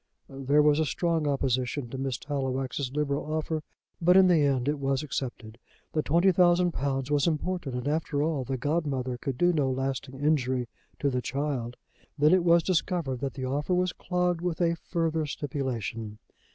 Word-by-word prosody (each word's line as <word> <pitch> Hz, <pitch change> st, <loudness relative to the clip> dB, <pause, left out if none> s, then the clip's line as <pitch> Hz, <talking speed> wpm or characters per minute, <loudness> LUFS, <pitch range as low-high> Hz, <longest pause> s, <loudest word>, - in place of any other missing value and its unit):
There 135 Hz, +2 st, +2 dB
was 150 Hz, 0 st, +4 dB
a 160 Hz, -, +2 dB
strong 165 Hz, +2 st, 0 dB
opposition 130 Hz, -1 st, 0 dB
to 135 Hz, -, -5 dB
Miss 135 Hz, -2 st, -2 dB
Tallowax's 135 Hz, -1 st, -3 dB
liberal 145 Hz, +1 st, -2 dB
offer, 155 Hz, 0 st, -1 dB, 0.4 s
but 180 Hz, +2 st, +6 dB
in 190 Hz, -, +8 dB
the 170 Hz, -3 st, +5 dB
end 135 Hz, -3 st, +1 dB
it 145 Hz, 0 st, 0 dB
was 135 Hz, +1 st, 0 dB
accepted. 120 Hz, -6 st, -5 dB, 0.3 s
The 155 Hz, -, +2 dB
twenty 170 Hz, +6 st, +3 dB
thousand 175 Hz, 0 st, +4 dB
pounds 135 Hz, -2 st, -2 dB
was 145 Hz, +2 st, +3 dB
important, 160 Hz, -3 st, -2 dB
and, 125 Hz, +2 st, -3 dB
after 150 Hz, -1 st, 0 dB
all, 155 Hz, -4 st, 0 dB
the 130 Hz, +1 st, -3 dB
godmother 135 Hz, -3 st, -1 dB
could 135 Hz, -2 st, -3 dB
do 175 Hz, +4 st, +3 dB
no 145 Hz, -4 st, +1 dB
lasting 135 Hz, 0 st, -3 dB
injury 130 Hz, -4 st, +1 dB, 0.3 s
to 140 Hz, -, 0 dB
the 125 Hz, -1 st, -1 dB
child. 130 Hz, -2 st, -3 dB, 0.4 s
Then 150 Hz, +3 st, +5 dB
it 185 Hz, -2 st, +4 dB
was 170 Hz, -1 st, +5 dB
discovered 170 Hz, -7 st, 0 dB
that 135 Hz, 0 st, -4 dB
the 130 Hz, -2 st, -4 dB
offer 145 Hz, +7 st, 0 dB
was 180 Hz, 0 st, +1 dB
clogged 180 Hz, -1 st, -1 dB
with 175 Hz, -2 st, -2 dB
a 170 Hz, -1 st, +3 dB
further 165 Hz, -2 st, -1 dB
stipulation. 120 Hz, -7 st, -4 dB
145 Hz, 180 wpm, -28 LUFS, 130-165 Hz, 0.4 s, in